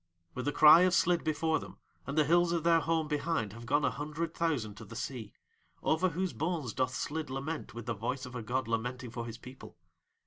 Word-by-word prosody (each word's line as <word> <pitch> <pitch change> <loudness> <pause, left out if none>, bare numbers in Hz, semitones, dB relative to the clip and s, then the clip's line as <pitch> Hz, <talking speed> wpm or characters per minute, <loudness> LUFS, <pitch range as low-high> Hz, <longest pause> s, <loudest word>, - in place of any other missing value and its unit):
With 125 - -4
the 145 - +1
cry 155 +3 +8
of 185 0 +4
Slid 175 0 +3
before 160 0 +1
them - - -11 0.3
and 140 +3 -4
the 155 - +6
hills 170 +3 +3
of 170 -2 0
their 165 -1 +5
home 160 -1 0
behind 150 -8 -1
have 115 +1 -10
gone 145 +2 +2
a 125 - +2
hundred 155 +4 -4
thousand 145 -11 -1
to 110 - -9
the 115 - -11
sea, 115 -4 -5 0.5
over 170 +4 +2
whose 180 +2 -2
bones 155 -7 -2
doth 130 0 -1
Slid 155 +2 -3
lament 140 +1 -5
with 120 -1 -7
the 120 - -1
voice 125 +5 -3
of 125 - -10
a 125 - -4
god 125 +2 -2
lamenting 120 +2 -3
for 120 -1 -5
his 115 0 -7
people. 125 -6 -12
140 Hz, 220 wpm, -31 LUFS, 120-165 Hz, 0.5 s, cry